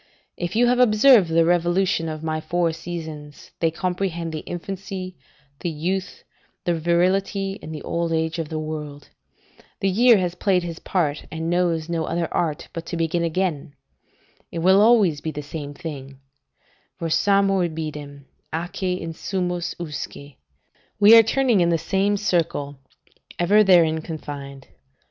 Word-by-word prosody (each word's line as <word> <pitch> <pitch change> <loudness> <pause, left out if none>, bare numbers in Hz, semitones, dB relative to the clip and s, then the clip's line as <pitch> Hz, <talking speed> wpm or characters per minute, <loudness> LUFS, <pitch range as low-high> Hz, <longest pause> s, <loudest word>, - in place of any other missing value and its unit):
If 175 +3 -4
you 240 +2 +4
have 245 +1 +2
observed 220 -4 +6
the 165 0 +3
revolution 175 0 +1
of 155 0 -6
my 155 0 -2
four 175 0 0
seasons, 160 -3 -8
they 165 - +2
comprehend 175 -1 -3
the 155 - -3
infancy, 185 +2 -6 0.4
the 175 - -2
youth, 180 +5 -3 0.4
the 175 - +2
virility, 190 +4 0
and 160 - -8
the 155 -2 -7
old 170 0 -2
age 160 +1 -1
of 160 -2 -3
the 160 - -4
world: 150 -2 -6 0.7
the 195 - +1
year 230 +4 +5
has 180 -2 -1
played 180 0 +1
his 170 -1 -6
part, 155 -6 -1
and 160 +1 -3
knows 170 -3 +1
no 165 -2 -2
other 170 0 -1
art 155 -4 -1
but 165 0 -6
to 170 - -4
begin 165 +1 0
again; 165 -4 -2 0.8
it - - -6
will 190 +2 +6
always 210 -10 +4
be 160 - -3
the 150 -1 -6
same 145 -1 -7
thing: 140 -5 -8 0.8
"'Versamur 195 +2 +2
ibidem, 150 -3 -7 0.3
atque 180 +3 -3
insumus 175 +1 -3
usque.' 145 -3 -7 0.6
["We 210 +2 +9
are 230 - +10
turning 230 -2 +2
in 170 - +3
the 170 - +2
same 195 +5 0
circle, 160 -8 -1 0.6
ever 205 +5 +4
therein 165 -5 +4
confined." 140 -4 -8
170 Hz, 150 wpm, -23 LUFS, 155-190 Hz, 0.8 s, are